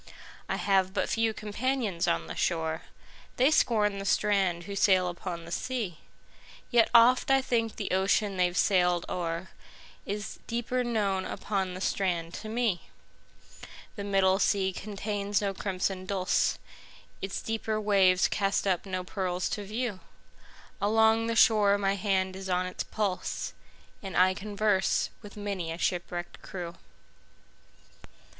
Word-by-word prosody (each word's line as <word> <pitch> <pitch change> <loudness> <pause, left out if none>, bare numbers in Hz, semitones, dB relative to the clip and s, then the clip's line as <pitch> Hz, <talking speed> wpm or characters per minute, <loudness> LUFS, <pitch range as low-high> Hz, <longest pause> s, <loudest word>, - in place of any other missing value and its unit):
I - - 0
have 190 -1 +1
but - - 0
few 225 -1 +1
companions 215 -3 -2
on 85 -1 +1
the 80 - -6
shore:They 165 - -2
scorn 210 -8 +2
the 195 - -5
strand 195 -4 +1
who 200 +2 -6
sail 185 -2 +4
upon 175 -1 -5
the 170 - -10
sea; 215 -5 -3 0.7
Yet 235 -2 +5
oft 240 +3 +6
I 270 0 +5
think 230 -4 0
the 205 - -4
ocean 195 +2 +2
they've 180 -1 +1
sailed 180 -3 +3
o'erIs 180 +4 -6
deeper 240 +2 -1
known 205 -5 0
upon 190 -2 -2
the 185 - -7
strand 175 -4 -1
to 215 - -7
me. 220 -6 -1 1.1
The 200 - -5
middle 195 -1 +3
sea 190 -1 +2
contains 205 0 -2
no 200 -1 -1
crimson 185 -1 -2
dulse, 190 -1 +1 0.6
Its 195 0 -3
deeper 220 -1 -2
waves 195 -3 +4
cast 200 0 0
up 190 0 0
no 185 -1 -3
pearls 180 -1 -2
to 205 - -3
view; 215 0 -3 0.8
Along 220 +2 +3
the 230 - -1
shore 210 -3 +5
my 195 -1 +1
hand 190 -2 0
is 190 0 -7
on 180 0 +1
its 185 - -4
pulse, 200 -4 -3 0.5
And 195 -2 -5
I 185 +1 +5
converse 205 -1 0
with 205 -1 -12
many 195 -5 -3
a 165 - -4
shipwrecked 175 -1 -3
crew. 175 -3 -6
195 Hz, 135 wpm, -29 LUFS, 185-215 Hz, 1.1 s, oft